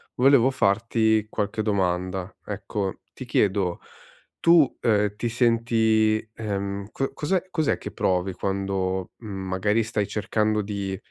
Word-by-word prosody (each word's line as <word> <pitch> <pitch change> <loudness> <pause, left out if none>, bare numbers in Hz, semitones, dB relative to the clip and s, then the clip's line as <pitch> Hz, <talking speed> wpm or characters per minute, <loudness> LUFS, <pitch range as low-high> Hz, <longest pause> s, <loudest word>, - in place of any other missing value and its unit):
volevo 135 0 +5
farti 110 -1 +2
qualche 105 0 -2
domanda. 95 -2 -1
Ecco 100 -1 -4
ti - - -8
chiedo 95 -3 +1 0.6
tu, 165 -4 +5
ehm, 105 -2 +2
ti 120 - -1
senti, 115 -2 +2
ehm, 100 -2 -3
co 135 - -2
cos'è 180 +4 0
cos'è 155 -3 +1
che - - -7
provi 90 +1 0
quando, 95 -1 -2
mhmm, 115 - -11 0.2
magari 105 +4 +1
stai 105 -2 -1
cercando 105 0 0
di 100 -2 -4
105 Hz, 125 wpm, -25 LUFS, 95-115 Hz, 0.6 s, volevo